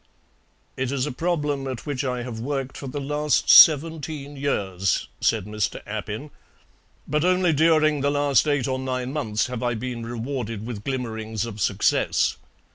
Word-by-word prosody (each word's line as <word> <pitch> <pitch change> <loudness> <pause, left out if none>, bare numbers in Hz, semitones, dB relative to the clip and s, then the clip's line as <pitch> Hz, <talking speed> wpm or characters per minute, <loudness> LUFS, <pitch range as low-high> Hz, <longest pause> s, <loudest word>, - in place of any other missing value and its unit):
"It 130 0 -1
is 135 -2 0
a 150 - -3
problem 145 -2 -1
at 130 -3 -5
which 140 -3 -2
I 125 -2 -2
have 120 -2 -6
worked 135 +1 -3
for 140 - -7
the 145 +3 -4
last 150 +1 +1
seventeen 155 -2 +5
years," 95 -9 -1
said 110 -4 +1
Mr. 105 0 -2
Appin, 110 +6 -5 0.8
"but 150 0 0
only 180 -1 +3
during 155 -1 +3
the 140 - +2
last 145 -1 +2
eight 145 -4 +1
or 130 -1 -1
nine 130 0 -3
months 110 -8 -1
have 125 -1 -5
I 120 -1 0
been 120 0 -5
rewarded 115 -2 -4
with 110 -4 -6
glimmerings 110 -4 -3
of 110 -2 -7
success. - - +1
130 Hz, 160 wpm, -24 LUFS, 115-145 Hz, 0.8 s, seventeen